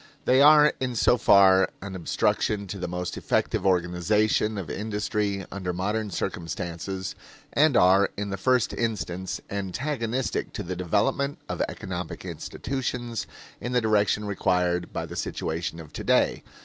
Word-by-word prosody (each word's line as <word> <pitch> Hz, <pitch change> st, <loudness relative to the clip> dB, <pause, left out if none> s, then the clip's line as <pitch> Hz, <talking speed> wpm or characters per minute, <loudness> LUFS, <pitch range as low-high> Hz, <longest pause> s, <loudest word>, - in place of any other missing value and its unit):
They 130 Hz, +2 st, +5 dB
are 150 Hz, +1 st, +7 dB
in 125 Hz, -2 st, -2 dB
so 120 Hz, -, +4 dB
far 95 Hz, -4 st, +6 dB
an 100 Hz, -1 st, -7 dB
obstruction 100 Hz, +3 st, 0 dB
to 100 Hz, -, -5 dB
the 90 Hz, -, -3 dB
most 90 Hz, 0 st, -4 dB
effective -, -, 0 dB
organization 95 Hz, +4 st, +1 dB
of 95 Hz, -5 st, -4 dB
industry 105 Hz, -1 st, -2 dB
under 95 Hz, -3 st, -3 dB
modern 105 Hz, +4 st, -1 dB
circumstances; 85 Hz, +2 st, -4 dB, 0.4 s
and 145 Hz, -3 st, +4 dB
are, 95 Hz, +2 st, +5 dB
in 100 Hz, 0 st, -3 dB
the 95 Hz, -, -2 dB
first 125 Hz, +4 st, +2 dB
instance, 95 Hz, -5 st, -3 dB
antagonistic 115 Hz, +5 st, -2 dB
to 105 Hz, -, -4 dB
the 90 Hz, 0 st, -4 dB
development 110 Hz, -, 0 dB
of -, -, -3 dB
economic 90 Hz, -2 st, -6 dB
institutions 120 Hz, -3 st, -4 dB, 0.3 s
in 120 Hz, +2 st, -4 dB
the 125 Hz, -, +4 dB
direction 105 Hz, -1 st, +2 dB
required 90 Hz, -3 st, 0 dB
by -, -, -3 dB
the -, -, -9 dB
situation 80 Hz, +1 st, -3 dB
of 80 Hz, -3 st, -11 dB
today. -, -, +2 dB
100 Hz, 140 wpm, -26 LUFS, 90-115 Hz, 0.4 s, are